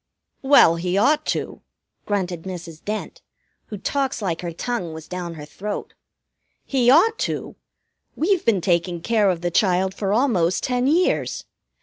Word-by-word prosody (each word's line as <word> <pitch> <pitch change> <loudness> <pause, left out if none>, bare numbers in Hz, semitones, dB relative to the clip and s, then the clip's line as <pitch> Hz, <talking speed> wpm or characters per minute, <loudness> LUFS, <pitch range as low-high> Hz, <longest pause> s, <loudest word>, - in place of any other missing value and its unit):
"Well, 265 - +6
he 180 +2 -1
ought 300 +8 +2
to," - - -3 0.5
grunted 185 -5 -2
Mrs. 170 -3 -8
Dent, 215 - -5 0.5
who 210 - -6
talks 270 +4 -1
like 180 -6 -2
her 175 -1 -4
tongue 180 -1 -4
was 160 -1 -9
down 175 -2 -5
her 150 -2 -8
throat. 205 +7 -6 0.7
"He 255 -3 +2
ought 445 - +5
to! - - -3 0.6
We've 360 +2 +1
been 215 -6 +2
taking 170 0 0
care 215 0 +2
of 175 -3 -1
the 175 0 -1
child 190 0 +2
for 195 0 -2
almost 205 -8 +2
ten 250 0 0
years. 340 +5 +1
195 Hz, 150 wpm, -22 LUFS, 175-250 Hz, 0.7 s, Well